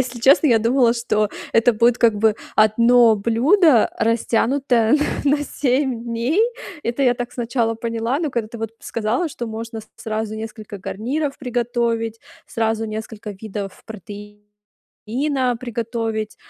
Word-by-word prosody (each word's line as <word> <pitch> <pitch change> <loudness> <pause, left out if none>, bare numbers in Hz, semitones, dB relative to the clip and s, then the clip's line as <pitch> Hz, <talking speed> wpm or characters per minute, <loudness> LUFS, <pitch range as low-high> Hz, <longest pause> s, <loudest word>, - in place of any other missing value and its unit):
Если 245 -2 -3
честно, 275 +5 +5
я 230 -4 +5
думала, 235 +1 +3
что 215 -3 0 0.2
это 230 +1 +4
будет, 235 +2 +3
как 230 -3 +4
бы, 215 0 +2 0.2
одно 230 +1 +5
блюдо, 245 - +4
растянутое 230 +1 +1 0.3
на 290 +1 +3
на 290 - -3
7 260 -4 -1
дней. 235 - 0 0.4
Это 240 +4 -1
я 245 -2 +4
так 245 0 -5
сначала 235 -1 -1
поняла, 230 +5 -2
но 310 -4 -1
когда 235 -3 -2
ты 235 - -9
вот 225 -1 -4
сказала, 230 +9 -1
что 240 -4 -6
можно 225 0 -6
с 215 - -17
сразу 220 0 -4
несколько 215 -2 -8
гарниров 275 +10 -3
приготовить, 235 -3 -1 0.3
сразу 225 0 -1
несколько 215 0 -6
видов 200 -1 -7
протеина 210 - -5
приготовить. 225 -2 -3
230 Hz, 140 wpm, -21 LUFS, 220-245 Hz, 0.4 s, честно